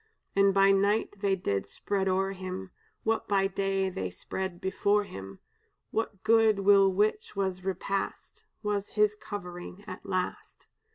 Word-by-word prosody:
"And 200 0 +5
by 195 0 +5
night 200 +1 +2
they 195 -1 +2
did 100 - -2
spread 195 -1 -1
o'er 190 +1 +1
him 185 0 -6 0.3
What 225 0 0
by 195 -1 +3
day 195 0 0
they 95 - -3
spread 175 - -5
before 200 +2 +2
him; 95 - -9 0.6
That 220 -3 -2
good 220 -2 +4
will 195 -1 +6
which 210 +3 0
was 190 -2 -1
repast 195 +1 -3 0.2
Was 205 -1 -1
his 210 0 +4
covering 180 -2 -7
at 185 -3 -8
last. 185 -2 -3
195 Hz, 145 wpm, -29 LUFS, 185-205 Hz, 0.6 s, will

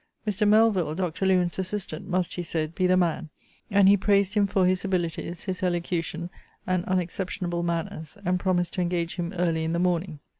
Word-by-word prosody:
Mr. 210 +1 +2
Melvill, 205 -7 +4
Dr. 185 +1 -1
Lewen's 180 -1 +2
assistant, 190 -1 -3
must, 185 -2 0
he 175 - -3
said, 160 -2 -3
be 185 +2 +1
the 185 0 +4
man; 170 -2 0 0.4
and 200 -2 +5
he 200 - +7
praised 200 0 +2
him 205 -2 +3
for 190 -1 +2
his 185 0 +2
abilities; 175 -2 -2
his 185 -2 -4
elocution, 175 -1 -2 0.3
and 185 -1 0
unexceptionable 180 -1 -2
manners; 165 -1 -3
and 180 +1 +1
promised 175 -2 0
to 185 - -1
engage 175 0 -1
him 175 -1 -2
early 170 -3 0
in 160 +1 -1
the - - 0
morning. 175 -2 0
180 Hz, 185 wpm, -26 LUFS, 170-190 Hz, 0.4 s, he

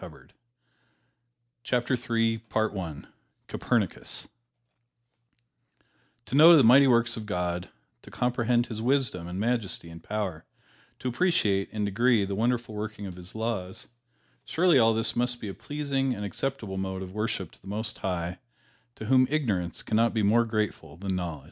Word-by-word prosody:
[Illustration: - - -13 1.3
COPERNICUS] 115 - -1 0.4
COPERNICUS - - -2 2.0
To 110 - -11
know 160 +4 +9
the 140 - +6
mighty 130 +4 +7
works 120 -1 +3
of 110 -1 -7
God; 90 -2 -2 0.3
to - - -14
comprehend 120 -1 +1
His 110 -3 -6
wisdom 120 -9 +1
and 90 +2 -5
majesty 110 -6 -1
and 85 0 -11
power; 100 -7 -3 0.5
to - - -5
appreciate, 120 - +1
in 105 -1 -2
degree, 110 +1 +2
the 100 - -4
wonderful 115 +2 0
working 105 -1 -5
of 95 -2 -7
His 90 +2 -9
laws, 110 -5 -3 0.6
surely 170 -3 +3
all 115 -1 +4
this 115 0 0
must 120 0 +2
be 105 - -6
a - - -5
pleasing 140 -2 -2
and 105 - -5
acceptable 105 -1 -4
mode 95 0 -3
of 95 0 -9
worship 105 +2 -3
to - - -22
the - - -15
Most 110 +2 -2
High, 90 -2 -3 0.6
to 110 - -8
whom 130 +2 +4
ignorance 105 - -1
can 110 - 0
not 115 +1 +2
be 110 - +1
more 115 +4 +4
grateful 105 -9 -3
than 95 +1 -3
knowledge. 85 -4 -3
110 Hz, 150 wpm, -27 LUFS, 95-120 Hz, 2.0 s, know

